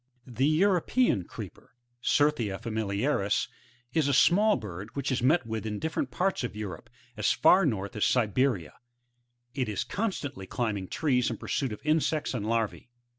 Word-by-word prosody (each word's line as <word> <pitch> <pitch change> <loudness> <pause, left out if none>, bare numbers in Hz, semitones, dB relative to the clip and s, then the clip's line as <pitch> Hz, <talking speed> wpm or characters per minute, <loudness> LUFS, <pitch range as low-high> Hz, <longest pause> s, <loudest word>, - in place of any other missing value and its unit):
The 130 +2 0
European 180 - +2
Creeper, - - -10 0.2
— 120 0 -43
Certhia 125 -10 +1
familiaris, 110 0 0 0.2
— 120 +1 -34
is 160 -3 +2
a 140 - +2
small 210 +9 +5
bird 105 -1 -7
which 140 -1 -2
is 130 - 0
met 140 +3 +3
with 110 -1 -4
in 105 -1 -3
different 160 +8 -2
parts 190 -5 0
of 120 - -4
Europe, 100 -6 -6 0.3
as - - +1
far 185 -2 +5
north 100 -6 -3
as 105 - 0
Siberia; 110 - +1 0.8
it 130 -5 -2
is 105 - -1
con 225 +2 -1
stantly 140 - -7
climbing 105 -6 -2
trees 130 - +1
in - - -4
pursuit 135 -4 -2
of 105 - -7
insects 155 -1 +1
and 110 -4 -3
larvae. 115 +1 -1
120 Hz, 170 wpm, -28 LUFS, 105-150 Hz, 0.8 s, small